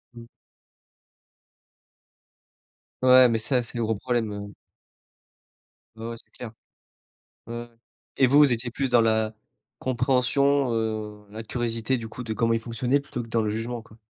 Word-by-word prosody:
Mmh. 120 Hz, 0 st, -10 dB, 2.8 s
Ouais, 130 Hz, 0 st, +8 dB
mais 115 Hz, -1 st, +1 dB
ça, 125 Hz, +2 st, +2 dB
c'est 120 Hz, +1 st, -4 dB
le -, -, +1 dB
gros 110 Hz, 0 st, 0 dB
problème, 120 Hz, 0 st, -1 dB
heu. 100 Hz, 0 st, -7 dB, 1.4 s
Ouais, 110 Hz, -, -7 dB
ouais, 115 Hz, -, -5 dB
c'est -, -, -20 dB
clair. 120 Hz, -3 st, -9 dB, 1.0 s
Ouais, 115 Hz, -, -5 dB
ouais. 120 Hz, -, -12 dB, 0.5 s
Et 135 Hz, -, +5 dB
vous, 140 Hz, +3 st, +5 dB
vous 145 Hz, -3 st, +6 dB
étiez 120 Hz, +1 st, -2 dB
plus 135 Hz, +3 st, -2 dB
dans 120 Hz, -1 st, +5 dB
la 110 Hz, -1 st, +1 dB, 0.5 s
compréhension, 130 Hz, +1 st, +2 dB
heu, 110 Hz, -2 st, -3 dB
la 110 Hz, +2 st, -7 dB
curiosité, 115 Hz, +2 st, -2 dB
du 115 Hz, -1 st, -7 dB
coup, 125 Hz, -, -8 dB
de 115 Hz, -2 st, -4 dB
comment 115 Hz, +1 st, +1 dB
ils 115 Hz, -, +1 dB
fonctionnaient 120 Hz, +4 st, 0 dB
plutôt 130 Hz, -3 st, -6 dB
que 115 Hz, -, -11 dB
dans 115 Hz, 0 st, +1 dB
le 105 Hz, -, -1 dB
jugement, 115 Hz, +2 st, -4 dB
quoi? 110 Hz, -1 st, -18 dB
115 Hz, 160 wpm, -25 LUFS, 110-125 Hz, 2.8 s, Ouais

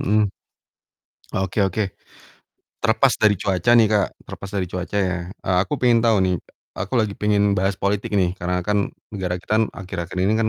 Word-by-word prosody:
mhm. 105 Hz, +1 st, +3 dB, 1.1 s
Oke 95 Hz, +2 st, 0 dB
oke. 95 Hz, +3 st, 0 dB, 1.0 s
Terlepas -, -, +4 dB
dari 105 Hz, -1 st, +4 dB
cuaca 95 Hz, +4 st, +1 dB
nih, 115 Hz, -, +6 dB
Kak, 105 Hz, -2 st, +2 dB, 0.2 s
terlepas 100 Hz, -, -8 dB
dari 100 Hz, -3 st, -1 dB
cuaca 90 Hz, +2 st, -4 dB
ya, 95 Hz, -2 st, +1 dB, 0.2 s
eee, 95 Hz, -3 st, -2 dB
aku -, -, -7 dB
pengen 120 Hz, -2 st, +4 dB
tau 110 Hz, -3 st, +4 dB
nih, 90 Hz, -1 st, +2 dB, 0.4 s
aku 95 Hz, +4 st, -5 dB
lagi 105 Hz, -3 st, 0 dB
pengen 105 Hz, -1 st, +2 dB
bahas 95 Hz, +1 st, 0 dB
politik 100 Hz, +1 st, -1 dB
nih, 90 Hz, -3 st, +2 dB
karena 90 Hz, 0 st, -1 dB
kan 105 Hz, -1 st, +1 dB, 0.2 s
negara 90 Hz, -2 st, -2 dB
kita 105 Hz, -, -6 dB
kan 110 Hz, -, +4 dB
akhir-akhir 90 Hz, -2 st, -6 dB
ini 100 Hz, +4 st, +2 dB
kan 110 Hz, 0 st, +2 dB
100 Hz, 175 wpm, -22 LUFS, 90-105 Hz, 1.1 s, nih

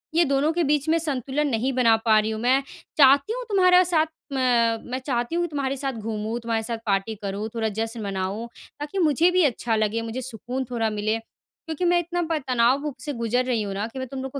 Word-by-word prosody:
ये 340 Hz, -, +5 dB
दोनों 280 Hz, +2 st, +2 dB
के 345 Hz, +1 st, +1 dB
बीच 290 Hz, -1 st, +1 dB
में 325 Hz, -, +4 dB
संतुलन 290 Hz, -1 st, -1 dB
नहीं 255 Hz, 0 st, 0 dB
बना 240 Hz, -3 st, +4 dB
पा 220 Hz, -1 st, +5 dB
रही 215 Hz, +1 st, -1 dB
हूँ। 220 Hz, -, -4 dB
मैं 255 Hz, +3 st, +3 dB, 0.4 s
चाहती 280 Hz, +6 st, +5 dB
हूँ -, -, -4 dB
तुम्हारा 365 Hz, -2 st, +5 dB
साथ, 330 Hz, -3 st, +2 dB, 0.3 s
म -, -, -1 dB, 0.5 s
मैं 255 Hz, -, -2 dB
चाहती 245 Hz, +2 st, -1 dB
हूँ 345 Hz, -, +1 dB
कि -, -, -1 dB
तुम्हारे 275 Hz, -2 st, -2 dB
साथ 270 Hz, 0 st, -2 dB
घूमूँ, 220 Hz, 0 st, -4 dB
तुम्हारे 230 Hz, -1 st, -2 dB
साथ 230 Hz, +1 st, -3 dB
पार्टी 200 Hz, +1 st, 0 dB
करूँ, 200 Hz, +2 st, -4 dB
थोड़ा 220 Hz, -1 st, 0 dB
जश्न 225 Hz, +1 st, -3 dB
मनाऊँ, 195 Hz, +3 st, -3 dB, 0.3 s
ताकि 295 Hz, +6 st, -4 dB
मुझे 325 Hz, 0 st, +4 dB
भी 365 Hz, 0 st, +3 dB
अच्छा 240 Hz, -3 st, 0 dB
लगे, 215 Hz, +1 st, 0 dB
मुझे 230 Hz, +3 st, -5 dB
सुकून 255 Hz, +1 st, -3 dB
थोड़ा 225 Hz, -2 st, 0 dB
मिले, 215 Hz, +1 st, -1 dB
क्योंकि 320 Hz, +8 st, -8 dB
मैं 350 Hz, 0 st, +4 dB
इतना 350 Hz, +1 st, -2 dB
प 320 Hz, -, +2 dB
तनाव 260 Hz, +4 st, +2 dB
से 295 Hz, -, -4 dB
गुजर 235 Hz, +1 st, 0 dB
रही 245 Hz, -3 st, 0 dB
हूँ 200 Hz, -2 st, -4 dB
ना, 200 Hz, +2 st, -2 dB
कि 245 Hz, +3 st, -8 dB
मैं 260 Hz, -, -4 dB
तुम 265 Hz, +1 st, -6 dB
लोगों 265 Hz, +1 st, -5 dB
255 Hz, 225 wpm, -24 LUFS, 225-295 Hz, 0.5 s, ये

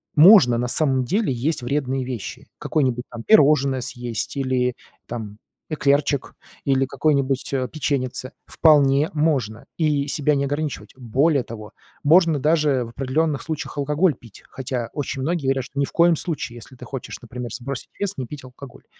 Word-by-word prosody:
можно 155 Hz, -, +8 dB
на 120 Hz, +1 st, -1 dB
самом 130 Hz, -1 st, +1 dB
деле 195 Hz, -, 0 dB
есть 135 Hz, +5 st, -1 dB
вредные 135 Hz, +1 st, -1 dB
вещи: 125 Hz, -5 st, -6 dB
какое-нибудь, 130 Hz, -5 st, 0 dB
там, 120 Hz, -1 st, -7 dB
пирожное 140 Hz, -, +4 dB
съесть 120 Hz, -2 st, -4 dB
или, 130 Hz, -2 st, 0 dB, 0.3 s
там, 110 Hz, -3 st, -7 dB, 0.3 s
эклерчик, 145 Hz, -2 st, +1 dB, 0.3 s
или 135 Hz, -1 st, +2 dB
какой-нибудь, 140 Hz, -1 st, 0 dB
э, 130 Hz, -2 st, 0 dB
печеньице. 130 Hz, -4 st, -2 dB, 0.2 s
Вполне 145 Hz, -2 st, +4 dB
можно 135 Hz, -9 st, 0 dB
и 150 Hz, -3 st, +1 dB
себя 150 Hz, 0 st, +1 dB
не 140 Hz, 0 st, 0 dB
ограничивать. 145 Hz, +1 st, -4 dB
Более 135 Hz, +4 st, +1 dB
того, 110 Hz, -2 st, -10 dB, 0.3 s
можно 165 Hz, 0 st, +5 dB
даже 150 Hz, -3 st, +2 dB
в -, -, -9 dB
определённых 140 Hz, +4 st, -1 dB
случаях 155 Hz, -2 st, -5 dB
алкоголь 150 Hz, +3 st, +2 dB
пить. 115 Hz, -4 st, -16 dB
Хотя 125 Hz, -3 st, -4 dB
очень 140 Hz, -2 st, -3 dB
многие 165 Hz, +3 st, -1 dB
говорят, 135 Hz, -1 st, +1 dB
что 140 Hz, +2 st, -7 dB
ни 140 Hz, -, +3 dB
в -, -, -11 dB
коем 170 Hz, 0 st, +4 dB
случае, 155 Hz, -7 st, -4 dB
если 120 Hz, +2 st, -12 dB
ты -, -, -12 dB
хочешь, 135 Hz, -2 st, -7 dB
например, 120 Hz, 0 st, -7 dB
сбросить 135 Hz, +1 st, -5 dB
вес, 200 Hz, -1 st, -1 dB
не 130 Hz, -, -3 dB
пить 140 Hz, +2 st, -9 dB
алкоголь. 130 Hz, +1 st, -13 dB
135 Hz, 160 wpm, -22 LUFS, 125-150 Hz, 0.3 s, можно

